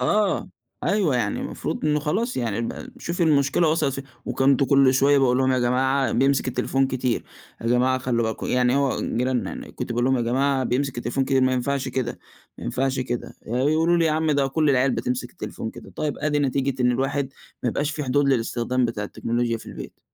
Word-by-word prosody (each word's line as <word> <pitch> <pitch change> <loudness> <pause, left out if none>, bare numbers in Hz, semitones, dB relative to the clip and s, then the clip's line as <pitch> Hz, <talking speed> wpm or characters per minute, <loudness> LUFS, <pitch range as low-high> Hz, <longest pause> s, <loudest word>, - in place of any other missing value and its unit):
آه، 210 -2 +1 0.4
أيوه، 185 -11 +2
يعني 105 -4 -1
المفروض - - -4
إنه 150 0 +2
خلاص 215 - -1
يعني 115 -2 -1
ب 115 - -5
شوفي 170 +1 -2
المشكلة 150 +1 +3
وصلت 155 -4 +1
فين؟ 135 0 -6 0.2
وكنت 135 0 +2
كُلّ 135 -1 +4
شوية 140 +2 +4
باقول 125 -2 +3
لهم: 130 0 +2
"يا 130 - +2
جماعة 130 +1 +1
بيمسك 135 +1 +2
التليفون 135 +2 +1
كتير، 125 -2 -1 0.4
يا 115 - -5
جماعة 125 +2 +3
خلّوا 120 -3 0
بالكم"، 110 - -4
يعني 125 +1 +2
هو 140 -2 +1
جيراننا 125 -4 -1
يعني، - - -8
كنت - - -6
باقول 120 +1 0
لهم: 130 0 +3
"يا 120 - 0
جماعة 135 +3 +1
بيمسك 130 0 -1
التليفون 120 +3 -1
كتير، 135 -1 +2
ما 130 - +3
ينفعش 130 +1 -1
كده، 125 -2 -3 0.4
ما - - -8
ينفعش 130 - -1
كده"، 120 -1 -4
ي - - -9
يقولوا 155 +7 +2
لي: 170 - +3
"يا 160 - +3
عم 160 0 +1
ده 140 -2 +2
كُلّ 150 +2 +1
العيال 130 0 +3
بتمسك 125 0 -2
التليفون - - -6
كده"، - - -12
طيب 150 -2 -2
أدي 150 -1 0
نتيجة 135 -2 0
إن 125 - +4
الواحد 135 +2 -1 0.3
ما 125 - +1
يبقاش 145 +6 -1
في 150 -1 -4
حدود 140 +2 +2
للاستخدام 125 0 +1
بتاع 115 -3 -2
التكنولوجيا 115 +2 -1
في - - -14
البيت. - - -9
130 Hz, 205 wpm, -24 LUFS, 125-140 Hz, 0.4 s, كُلّ